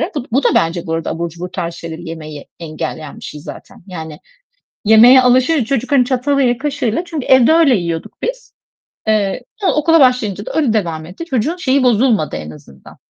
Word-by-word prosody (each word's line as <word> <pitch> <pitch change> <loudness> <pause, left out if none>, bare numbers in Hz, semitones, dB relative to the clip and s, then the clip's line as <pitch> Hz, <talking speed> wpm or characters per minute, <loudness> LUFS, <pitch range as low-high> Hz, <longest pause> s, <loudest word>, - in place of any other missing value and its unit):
Bu 285 - -2
d - - -18
bu 265 +2 +1
da - - +4
bence 170 +1 0
burada 165 0 -2
abur 170 +1 -3
cubur 175 +2 -8
tarzı 170 0 -5
şeyleri 165 0 -8
yemeyi 155 -3 -9
engelleyen 155 -1 -6
bir - - -13
şey 150 - -8
zaten, 155 +2 -12
yani, 160 -4 -8 0.7
yemeğe 235 +5 +7
alışır, 255 +2 +3
çocuk, 260 +1 -2
hani, 260 -3 +4
çatalıyla, 260 -1 +1
kaşığıyla 280 -2 -2
çünkü 320 -6 -5
evde 260 +3 +5
öyle 320 -6 +4
yiyorduk 170 -4 -4
biz. - - -5 0.5
Eee, 215 +2 0
sonra 400 -3 0
okula 325 +2 +3
başlayınca 220 -6 +1
da - - -5
öyle 290 -8 +1
devam 165 -7 -2
etti. 185 - -8
Çocuğun 280 +3 -1
şeyi 275 -6 +1
bozulmadı 235 -7 +2
en 75 0 -7
azından. 70 -3 -15
225 Hz, 185 wpm, -16 LUFS, 165-270 Hz, 0.7 s, yemeğe